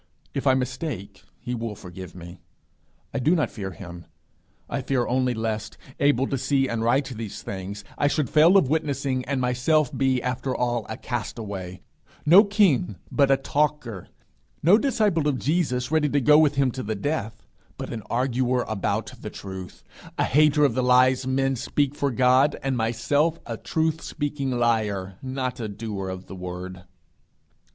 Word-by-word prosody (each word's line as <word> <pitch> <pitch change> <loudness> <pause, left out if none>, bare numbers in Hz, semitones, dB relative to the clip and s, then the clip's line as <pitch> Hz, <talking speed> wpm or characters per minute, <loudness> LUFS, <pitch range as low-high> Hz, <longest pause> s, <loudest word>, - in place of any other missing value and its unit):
If 140 - -2
I 130 - +5
mistake, 125 - -4
he 125 - -5
will 115 -3 -4
forgive 90 -1 -10
me. 85 0 -10 0.7
I - - -1
do 155 +8 +3
not 155 - 0
fear 100 -3 -5
him; 85 -4 -10 0.6
I 140 - -3
fear 130 -2 0
only 125 -1 +1
lest, 110 -1 -3 0.2
able 140 -2 +3
to 135 - -1
see 135 +1 +1
and 115 -2 -2
write 130 +4 +2
these 115 -4 -7
things, 100 +1 -6 0.2
I 145 - +3
should 145 -1 0
fail 160 - +6
of 185 - +4
witnessing, 140 -3 -1
and 140 0 -1
myself 125 +4 +1
be, 130 -2 +2
after 125 +1 -2
all, 120 -2 -1
a 110 - -4
castaway 105 -6 -5 0.4
no 180 +7 +8
king, 190 - +2 0.2
but 140 -2 +3
a 135 - +5
talker; 140 -7 -1 0.6
no 185 +8 +6
disciple 210 - +1
of 140 -3 +1
Jesus, 135 -4 0
ready 155 -2 +2
to 145 - +2
go 150 +3 +6
with 150 -2 +3
him 135 -2 +2
to 130 - -5
the 110 -2 -3
death, 110 -2 -3 0.3
but - - -5
an 115 - -5
arguer 125 0 +1
about 110 -4 -2
the - - -5
truth; 95 -2 -9 0.3
a - - +2
hater 150 +2 +4
of 140 - +2
the 130 - 0
lies 125 +1 +4
men 135 0 +1
speak 140 +3 0
for 140 -1 0
God, 130 +3 +4
and 135 -1 0
myself 135 +8 +1
a 115 - -4
truth 160 +6 -1
speaking 145 -2 -3
liar, 110 -6 0
not 130 -1 -3
a 110 - -3
doer 100 -2 -5
of 95 0 -6
the 95 - -9
word. 90 0 -7
130 Hz, 170 wpm, -25 LUFS, 110-145 Hz, 0.7 s, no